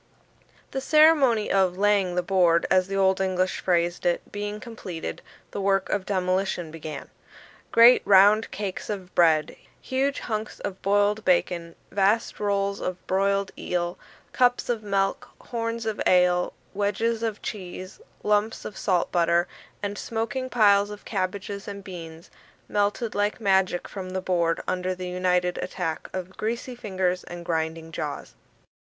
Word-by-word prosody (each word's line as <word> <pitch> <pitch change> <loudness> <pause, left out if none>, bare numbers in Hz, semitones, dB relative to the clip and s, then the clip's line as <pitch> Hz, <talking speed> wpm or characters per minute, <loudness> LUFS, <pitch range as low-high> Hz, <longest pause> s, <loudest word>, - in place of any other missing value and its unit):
The 270 - -3
ceremony 285 -7 +4
of 190 -2 +2
"laying 200 -3 +2
the 180 - +1
board," 175 -3 +3
as 185 -1 +4
the 195 - -4
Old 190 -1 +3
English 185 -1 0
phrased 175 -1 0
it, 175 -1 -1
being 205 +1 -4
completed, 215 -9 -7 0.3
the 200 - -4
work 195 -1 +1
of 195 -1 -1
demolition 185 -3 -1
began. 155 -2 -7 0.6
Great 235 +2 +7
round 205 +3 +6
cakes 200 -2 -5
of 190 -3 -5
bread 160 -3 +3 0.2
huge 270 +1 -1
junks 215 -1 -4
of 190 -1 -5
boiled 205 +2 +2
bacon 175 -2 +1 0.2
vast 205 +3 +1
rolls 200 -1 0
of 185 0 -4
broiled 195 +1 +1
eel 175 0 -3 0.3
cups 245 -1 +2
of 235 -3 0
milk 195 -2 -1
horns 230 -1 -4
of 220 -2 -2
ale 180 -1 +3 0.2
wedges 210 +3 0
of 220 -2 -3
cheese 185 - -7 0.2
lumps 210 +1 +1
of 205 - -6
salt 180 -3 +1
butter 170 0 +2 0.4
and 205 0 -3
smoking 255 +3 -3
piles 205 -4 +4
of 210 0 -10
cabbages 200 0 -3
and 200 -1 -7
beans, 165 -3 -9 0.4
melted 205 +3 0
like 205 +1 0
magic 190 -4 +2
from 190 -2 -7
the 185 0 -2
board 170 -3 0
under 185 0 -1
the 180 0 -6
united 180 0 0
attack 165 -4 -4
of 185 0 -6
greasy 235 +3 -3
fingers 185 -5 -1
and 175 0 -8
grinding 160 -1 -2
jaws. 150 -2 -5
195 Hz, 145 wpm, -25 LUFS, 180-210 Hz, 0.6 s, Great